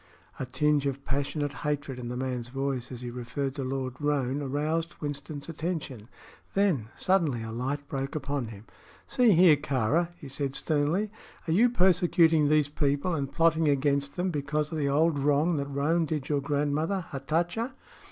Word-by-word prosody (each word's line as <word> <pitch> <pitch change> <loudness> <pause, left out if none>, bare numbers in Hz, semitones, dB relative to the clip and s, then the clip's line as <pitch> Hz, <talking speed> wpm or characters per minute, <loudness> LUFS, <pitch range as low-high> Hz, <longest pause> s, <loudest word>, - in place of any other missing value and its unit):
A 130 - -3
tinge 150 +1 +2
of 140 0 -4
passionate 145 +1 -1
hatred 145 -3 -2
in 120 - -5
the 125 - -4
man's 125 -2 -3
voice 135 -1 -3
as 125 -1 -7
he 120 -1 -5
referred 125 +3 -3
to 140 -1 -4
Lord 130 -1 -2
Roane 145 -2 0
aroused 155 +4 -1
Winston's 145 0 -5
attention. 155 - -4 0.5
Then, 185 - +2
suddenly, 160 -11 +1
a 110 - -5
light 135 +5 -3
broke 135 0 -4
upon 140 -3 -2
him. 110 -1 -10 0.4
"See 245 -5 +4
here, 170 -2 +7
Kāra," 145 +4 0
he 145 - -10
said, 135 0 -3
sternly, 160 +7 +1 0.4
"are - - 0
you 235 +7 +5
persecuting 175 -6 +4
these 150 -1 +3
people 145 +3 0
and 140 -4 -2
plotting 165 -1 +3
against 140 0 +1
them 180 +1 0
because 150 +1 -1
of 160 - -2
the 140 -1 +1
old 150 +1 +2
wrong 150 +4 +2
that 140 0 -2
Roane 155 +4 +1
did 150 -3 -3
your 145 -2 +1
grandmother, 150 +6 0
Hatatcha?" 175 - -1
145 Hz, 170 wpm, -28 LUFS, 135-160 Hz, 0.5 s, here